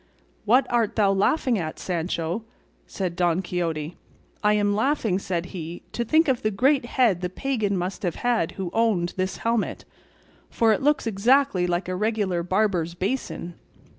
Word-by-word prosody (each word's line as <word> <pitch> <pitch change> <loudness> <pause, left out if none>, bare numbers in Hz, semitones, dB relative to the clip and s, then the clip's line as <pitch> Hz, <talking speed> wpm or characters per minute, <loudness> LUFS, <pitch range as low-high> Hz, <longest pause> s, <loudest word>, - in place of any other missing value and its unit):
"What 250 +5 +4
art 235 -3 +1
thou 205 -3 +3
laughing 225 +4 +2
at, 155 -2 -4
Sancho?" 170 +2 -2 0.4
said 185 -3 -3
Don 175 +1 +1
Quixote. 165 -3 -3 0.5
"I 210 0 +4
am 205 -1 +2
laughing," 220 -4 +1
said 175 -3 -2
he, 170 -1 -6
"to 240 - -2
think 315 +8 +3
of 260 -3 +1
the 215 - +1
great 260 +6 +2
head 235 -8 +2
the 180 - -2
pagan 210 -2 -1
must 180 +2 -3
have 175 -4 -2
had 240 -9 0
who 185 -3 -5
owned 215 -7 +1
this 185 0 -2
helmet, 230 -1 -1 0.6
for 225 -1 +3
it 275 - -1
looks 290 -1 +2
exactly 225 -2 +2
like 175 +1 -1
a 185 - -2
regular 205 -3 0
barber's 180 -2 0
basin." 190 -3 -3
195 Hz, 165 wpm, -24 LUFS, 175-230 Hz, 0.6 s, What